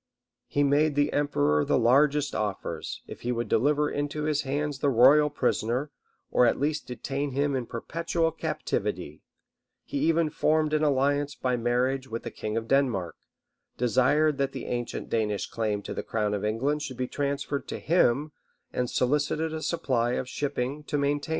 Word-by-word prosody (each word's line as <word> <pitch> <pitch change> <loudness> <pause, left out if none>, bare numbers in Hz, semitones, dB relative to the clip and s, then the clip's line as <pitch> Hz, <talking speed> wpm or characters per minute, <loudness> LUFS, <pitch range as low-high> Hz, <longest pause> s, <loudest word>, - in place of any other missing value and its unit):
He 145 - +1
made 145 +1 +3
the 145 +1 +2
emperor 75 - +2
the - - +2
largest 140 +4 +3
offers, 105 -3 -4
if - - -10
he 120 - -1
would 120 -1 -2
deliver 150 +7 +2
into 145 +1 -3
his 150 -1 +1
hands 145 +1 -2
the 145 - +2
royal 140 +5 +6
prisoner, 125 +2 -1 0.4
or 125 - +5
at - - +1
least 150 +2 -1
detain 135 +2 -3
him 140 +1 +1
in 125 -3 -2
perpetual 165 +6 -1
captivity 160 - -3 0.6
he 285 - -4
even 165 - +2
formed 155 0 +1
an 155 - +2
alliance 145 0 +1
by 125 -1 0
marriage 125 +3 0
with 115 -2 -5
the - - -5
king 110 +1 -4
of 115 0 -3
Denmark, 120 -11 +1 0.6
desired 135 +5 +2
that 135 0 0
the 130 - -6
ancient 120 -1 -3
Danish 105 -3 0
claim 105 -3 -2
to - - -5
the - - -3
crown 105 -2 -1
of 105 - -2
England 130 +8 0
should 140 -5 -5
be 125 - -2
transferred 140 0 -2
to - - -4
him, 150 -3 +2 0.4
and 125 -1 -1
solicited 150 +4 0
a 160 - -4
supply 125 -9 0
of 125 - -2
shipping 140 +1 -3
to 145 - -1
maintain 140 +1 +1
it. 145 - -9
140 Hz, 175 wpm, -27 LUFS, 120-150 Hz, 0.6 s, royal